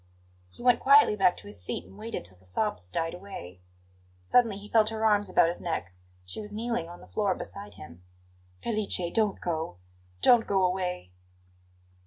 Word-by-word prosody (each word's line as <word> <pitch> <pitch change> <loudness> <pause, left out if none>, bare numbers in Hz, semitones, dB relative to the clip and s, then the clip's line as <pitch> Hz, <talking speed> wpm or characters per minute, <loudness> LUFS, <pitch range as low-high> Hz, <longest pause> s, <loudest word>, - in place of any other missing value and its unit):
He 240 - -13
went 245 -1 +5
quietly 280 -5 +6
back 190 -3 +3
to - - -13
his 100 -2 -7
seat 90 - -4
and - - -16
waited 220 - -6
till 90 0 -12
the - - -23
sobs 90 - -2
died 165 - -2
away. 175 - -9 0.6
Suddenly 225 - +3
he 205 +1 -10
felt 215 0 +4
her 220 0 -2
arms 205 -2 +3
about 175 - +5
his 170 - -3
neck; 95 - -3 0.3
she 90 - -7
was 210 0 -8
kneeling 220 -5 -2
on 175 - -11
the - - -14
floor 200 -3 0
beside 200 +1 -8
him. 85 +1 -12 0.6
"Felice 215 - 0
don't 215 -3 +1
go! 160 - -3 0.5
Don't 240 -2 +6
go 195 -1 +2
away!" 180 - -2
195 Hz, 180 wpm, -28 LUFS, 160-215 Hz, 0.6 s, quietly